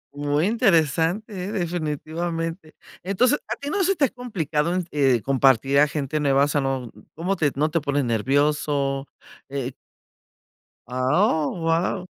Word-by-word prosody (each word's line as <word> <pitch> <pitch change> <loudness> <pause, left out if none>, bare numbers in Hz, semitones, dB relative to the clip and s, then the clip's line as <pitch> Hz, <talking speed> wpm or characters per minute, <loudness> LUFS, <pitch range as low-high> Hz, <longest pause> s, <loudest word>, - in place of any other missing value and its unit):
Muy 145 +2 0
interesante, 190 - +2
¿eh?, 200 - -4
definitivamente. 165 -1 -3 0.3
Entonces, 240 - +2
¿a - - -2
ti 285 +1 -6
no 395 +2 +1
se 390 +2 +2
te 295 - +3
ha - - -1
complicado 170 - -2
en, 185 -1 -1
eh, 135 -6 +2
compartir 135 0 +3
a 150 - +5
gente 145 0 -2
nueva?, 140 -1 +3
o - - +2
sea, 145 -1 0
no, 130 -3 -2 0.2
¿cómo 180 +5 -1
te 150 -6 +1
no 150 +3 +1
te 165 0 +1
pones 145 -1 0
nervioso?, 140 +3 0 0.4
eh 135 -2 -4 1.1
Ah, 145 - +2
¡oh, - - -3
guau! 165 +3 0
155 Hz, 155 wpm, -23 LUFS, 140-180 Hz, 1.1 s, a